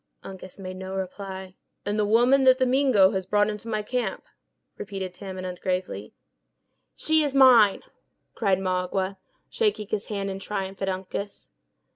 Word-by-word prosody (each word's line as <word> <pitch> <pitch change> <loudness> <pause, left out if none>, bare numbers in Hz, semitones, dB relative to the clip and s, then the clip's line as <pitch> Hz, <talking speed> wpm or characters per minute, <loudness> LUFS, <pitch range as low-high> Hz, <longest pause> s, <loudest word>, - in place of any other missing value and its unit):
Uncas 190 -1 -10
made 185 -1 -7
no 190 0 -6
reply. 190 0 -6 0.3
"And 205 +1 -1
the 210 - +2
woman 245 +5 +4
that 260 0 +7
the 260 - +2
Mingo 250 -7 +4
has 190 -1 -3
brought 205 +1 +2
into 210 +2 -8
my 215 -2 -2
camp?" 235 -3 -2 0.5
repeated 190 -2 -6
Tamenund, 185 -1 -7
gravely. 180 - -3 0.8
"She 315 0 +3
is 285 -2 -2
mine," 245 -7 +6 0.5
cried 195 -2 +1
Magua, 185 +1 -1 0.3
shaking 410 - 0
his 215 -1 -3
hand 200 -2 -3
in 190 - -5
triumph 195 -1 -5
at 195 - 0
Uncas. 190 +2 -5
195 Hz, 150 wpm, -25 LUFS, 190-220 Hz, 0.8 s, that